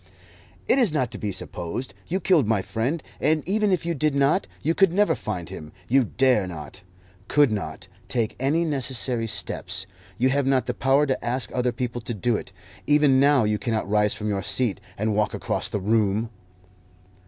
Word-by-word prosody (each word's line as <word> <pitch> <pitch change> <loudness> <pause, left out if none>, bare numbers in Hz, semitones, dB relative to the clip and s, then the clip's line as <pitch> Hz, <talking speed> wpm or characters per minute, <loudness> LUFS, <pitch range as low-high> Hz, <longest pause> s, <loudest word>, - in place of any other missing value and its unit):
"It - - +4
is 235 -9 +3
not 130 -6 0
to 110 - -7
be 105 - -2
supposed. 95 +5 -5
You 185 - -1
killed 165 - +3
my 110 -4 +1
friend; 130 - -2 0.2
and 155 +2 +1
even 210 +1 +2
if 180 -3 0
you 170 - 0
did 150 -1 0
not, 140 +7 +2 0.2
you 160 - +2
could 195 0 +4
never 205 +3 +3
find 90 -6 -4
him. 75 0 -9 0.2
You 130 +1 +4
dare 125 -4 +2
not, 85 +2 -9 0.5
could 145 -5 +4
not, 95 -3 -4 0.2
take 115 -4 -1
any 150 +6 +1
necessary 130 -5 0
steps. 100 -2 -3 0.3
You 130 +2 +3
have 140 0 +1
not 135 -1 +2
the - - -2
power 135 +2 +3
to 130 -2 -2
ask 125 +2 -1
other 125 0 +1
people 120 -1 -4
to 115 +1 -4
do 115 +3 +1
it. - - -5 0.4
Even 145 -3 +4
now 140 -2 +5
you 105 0 0
cannot 110 -1 -1
rise 105 0 +3
from 105 - -4
your 100 -2 -1
seat 105 -1 0 0.2
and 110 +1 0
walk 105 0 0
across - - -2
the 105 - -2
room." 110 +2 +1
125 Hz, 190 wpm, -24 LUFS, 105-145 Hz, 0.5 s, now